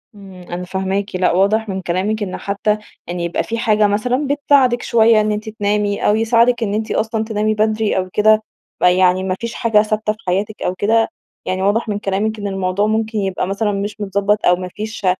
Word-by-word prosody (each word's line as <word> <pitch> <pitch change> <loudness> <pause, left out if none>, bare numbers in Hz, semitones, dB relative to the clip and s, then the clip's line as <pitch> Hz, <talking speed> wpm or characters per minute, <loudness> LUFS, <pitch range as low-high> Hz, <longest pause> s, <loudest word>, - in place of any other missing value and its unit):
إمم، 195 -2 -12 0.2
أنا 180 +1 -5
فاهماكِ. 190 +2 -3
لأ، 185 0 +2
واضح 205 +4 +2
مِن 190 -1 -3
كلامِك 200 +5 -1
إن 185 - -4
حتى 205 +1 -1 0.3
يعني 175 0 -4
يبقى 170 - -1
في 230 - -4
حاجة 215 -3 +3
مثلًا 250 +7 0
بتساعدك 275 -3 +3
شوية 225 -1 +4
إن 215 0 0
أنتِ 210 +1 -3
تنامي، 205 -1 -1
أو 210 - +4
يساعدك 230 +2 +3
إن 205 -2 -2
أنتِ 215 +1 -2
أصلًا 220 0 -1
تنامي 215 -1 0
بدري 215 0 0
أو 185 0 -1
كده، 215 +1 +4 0.4
فيعني 180 +1 +3
ما 185 -1 -1
فيش 235 0 -4
حاجة 225 -4 +3
ثابتة 215 0 -1
في 215 - -22
حياتِك 200 +4 -1
أو 180 - -1
كده. 225 +4 +2 0.4
يعني 185 0 -2
واضح 205 +4 +1
من 205 -1 -2
كلامِك 210 +2 -2
إن 205 - -3
الموضوع 195 +1 -1
ممكن 220 0 -1
يبقى 190 -2 -2
مثلًا 205 +2 -1
مش 205 +1 -3
متضبط 200 +1 0
أو 180 - +5
ما 185 0 -6
فيش 215 -1 -6
210 Hz, 200 wpm, -18 LUFS, 195-220 Hz, 0.4 s, أو